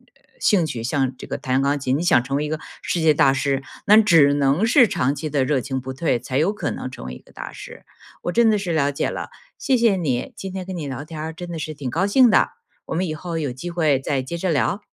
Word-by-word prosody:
呃 - - -30 0.2
兴趣 160 - +1
像 130 +2 -1
这 - - -9
个 - - -3
弹 130 +1 0
钢 140 +1 +1
琴， 130 -1 0
你 150 - -1
想 170 -8 +4
成 135 +2 -3
为 150 - -1
一 - - -4
个 155 0 -3 0.2
世 175 - -2
界 160 -1 +4
大 135 -2 +4
师， 135 0 0 0.2
那 210 -1 +7
只 165 -9 +5
能 145 +7 +2
是 245 +1 +6
长 135 -7 0
期 155 +1 -5
的 140 -3 +1
热 135 -1 +1
情 130 +2 -3
不 130 +1 -6
退， 135 -1 0
才 130 +3 -2
有 165 +6 +2
可 210 - -3
能 - - -5
成 130 - -10
为 65 - -6
一 65 - -10
个 - - -22
大 - - -8
师。 - - -11 0.4
我 175 - -1
真 230 +3 +4
的 215 - +3
是 190 -4 -2
了 145 -3 +2
解 140 - -1
了， - - -5 0.3
谢 265 - +2
谢 230 -4 +3
你， 135 -9 -2
今 195 - -6
天 185 -1 -5
跟 190 0 -6
你 155 -4 -4
聊 135 0 -5
天 155 0 -8
儿 160 +1 -4
真 175 +2 -8
的 165 - -5
是 155 0 -5
挺 140 -2 -6
高 185 +8 +1
兴 245 +3 +5
的， - - +4 0.4
我 - - -4
们 180 +3 0
以 160 - -3
后 165 +2 -5
有 145 -5 -2
机 130 +8 -6
会 155 -6 +2
再 135 0 -1
接 150 +6 -5
着 185 +2 -2
聊。 180 +7 0
155 Hz, 300 characters per minute, -22 LUFS, 135-180 Hz, 0.4 s, 那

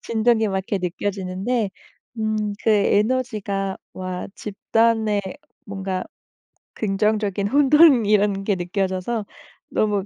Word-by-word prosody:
진동이 225 -1 +2
막 195 - -1
이렇게 190 +1 -2
느껴지는데 190 +4 -2 0.5
음 215 -1 -1
그 225 - +4
에너지가 210 -2 +1 0.2
와 185 -1 -5
집단의 220 0 +1 0.5
뭔가 190 -2 -3 0.7
긍정적인 205 -1 0
혼돈이라는 230 -8 +4
게 200 -1 +1
느껴져서 190 +4 -2 0.4
너무 205 -3 0
205 Hz, 240 characters per minute, -22 LUFS, 195-220 Hz, 0.7 s, 그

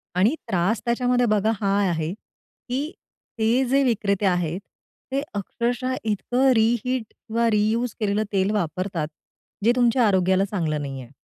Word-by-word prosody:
आणि 205 - +3
त्रास 195 +2 +1
त्याच्यामध्ये 245 +1 +2
बघा 215 -1 +2
हा 200 -1 +1 0.2
आहे, 160 0 -2
की 260 +6 -7 0.5
ते 230 +4 +3
जे 270 +2 +3
विक्रेते 205 -5 +1
आहेत. 175 -2 +1 0.5
ते 275 +1 0
अक्षरशः 240 +5 -2
इतकं 245 +5 +1
रिहीट 235 +2 +1
किंवा 230 +1 -1
रियूज 220 +3 +1
केलेलं 210 0 +1
तेल 195 +1 +2
वापरतात. 180 -3 -2 0.6
जे 230 - +5
तुमच्या 245 -1 +3
आरोग्याला 190 -1 +3
चांगलं 165 -7 -2
नाही 135 -2 -5
आहे. 125 0 -13
215 Hz, 140 wpm, -24 LUFS, 190-245 Hz, 0.6 s, जे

